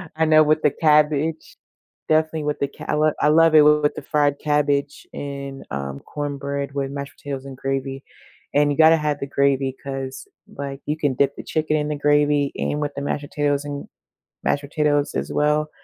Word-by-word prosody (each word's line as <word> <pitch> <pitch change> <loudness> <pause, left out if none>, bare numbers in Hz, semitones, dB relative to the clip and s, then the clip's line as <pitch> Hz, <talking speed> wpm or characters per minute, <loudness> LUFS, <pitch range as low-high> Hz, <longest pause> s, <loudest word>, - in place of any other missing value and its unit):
I 160 - +2
know 155 0 +6
with 155 +1 +2
the 150 - +3
cabbage, 150 +1 +1 0.5
definitely 155 0 +1
with 150 0 -2
the 140 - 0
ca - - -12
I - - +1
lo 155 0 +3
I - - +4
love 165 +1 +5
it 155 - +9
with 150 0 +4
the - - -6
fried 145 -1 +1
cabbage, 145 -1 0
and, 140 -1 -6
um, 70 0 -4
cornbread 140 -1 -4
with 135 -1 -2
mashed 140 0 -6
potatoes 140 -1 -6
and 135 -1 -9
gravy, 135 0 -3 0.5
and 145 0 +3
you 145 - -2
gotta 160 +1 +7
have 150 -2 -1
the 140 - -4
gravy 135 -1 +1
'cause, 135 - -6 0.3
like, 140 0 -6
you 150 +1 -2
can 145 -4 0
dip 140 +1 +1
the - - -8
chicken 155 -1 -1
in 150 0 -2
the 150 - -1
gravy, 145 -1 +2
and 150 - -1
with 145 -1 -2
the 140 - -4
mashed 145 +1 -2
potatoes 145 0 -1
and 145 -1 -6 0.6
mashed 145 - 0
potatoes 145 0 0
as - - -3
well, 150 +1 +1
145 Hz, 195 wpm, -22 LUFS, 140-150 Hz, 0.6 s, it